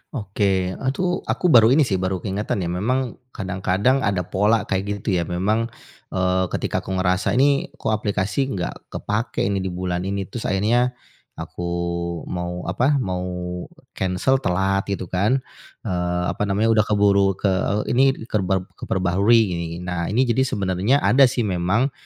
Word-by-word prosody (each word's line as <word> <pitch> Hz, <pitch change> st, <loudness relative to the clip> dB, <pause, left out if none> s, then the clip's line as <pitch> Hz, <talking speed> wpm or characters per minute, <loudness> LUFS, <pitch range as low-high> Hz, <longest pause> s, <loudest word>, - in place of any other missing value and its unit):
Oke, 95 Hz, -4 st, 0 dB
eee, 130 Hz, +7 st, -2 dB
tuh 180 Hz, -1 st, 0 dB
aku 180 Hz, -, +1 dB
baru 115 Hz, -4 st, +8 dB
ini 145 Hz, +5 st, +5 dB
sih 95 Hz, -8 st, 0 dB
baru 95 Hz, -1 st, -2 dB
keingatan 100 Hz, -1 st, -2 dB
ya, 85 Hz, -, -2 dB
memang 120 Hz, +7 st, -1 dB, 0.2 s
kadang-kadang 95 Hz, +6 st, +1 dB
ada 100 Hz, -6 st, 0 dB
pola 105 Hz, +5 st, +2 dB
kayak 100 Hz, 0 st, -2 dB
gitu, 95 Hz, -4 st, +1 dB
ya. 85 Hz, -, -2 dB
Memang, 105 Hz, +7 st, 0 dB, 0.5 s
eee, 95 Hz, 0 st, +2 dB
ketika -, -, -2 dB
aku 95 Hz, -, -5 dB
ngerasa 95 Hz, +2 st, +1 dB
ini 140 Hz, +2 st, +3 dB
kok -, -, -2 dB
aplikasi 105 Hz, +4 st, 0 dB
enggak 95 Hz, -9 st, -3 dB, 0.2 s
kepake 110 Hz, +3 st, -2 dB
ini 100 Hz, 0 st, 0 dB
di 95 Hz, -, -3 dB
bulan 90 Hz, 0 st, -3 dB
ini, 100 Hz, 0 st, -2 dB
terus 115 Hz, +4 st, -5 dB
akhirnya 120 Hz, +6 st, +1 dB, 0.4 s
aku 90 Hz, 0 st, -6 dB, 0.6 s
mau, 90 Hz, 0 st, -4 dB
apa, 130 Hz, +10 st, +2 dB
mau 90 Hz, -8 st, -2 dB, 0.6 s
kensel 95 Hz, +9 st, +1 dB
telat, 95 Hz, -2 st, 0 dB
gitu 95 Hz, -2 st, -4 dB
kan. 110 Hz, +9 st, +1 dB, 0.4 s
Eee, 90 Hz, 0 st, -1 dB
apa 105 Hz, -, -2 dB
namanya 105 Hz, +3 st, +2 dB
udah 110 Hz, -2 st, +4 dB
keburu 100 Hz, -2 st, +3 dB
ke 100 Hz, +1 st, 0 dB, 0.3 s
e -, -, -4 dB
ini 135 Hz, +2 st, +4 dB, 0.2 s
kerberp 95 Hz, -2 st, +1 dB, 0.2 s
keperbaharui 95 Hz, +5 st, +3 dB
gini 85 Hz, -1 st, -2 dB
gin 90 Hz, -, -7 dB
nah, 85 Hz, -1 st, -2 dB
ini 120 Hz, +6 st, +2 dB
jadi 130 Hz, +2 st, +1 dB
sebenarnya 100 Hz, +6 st, +1 dB
ada 135 Hz, +1 st, +6 dB
sih 120 Hz, -1 st, -1 dB
memang, 100 Hz, +7 st, +1 dB
100 Hz, 165 wpm, -22 LUFS, 90-115 Hz, 0.6 s, baru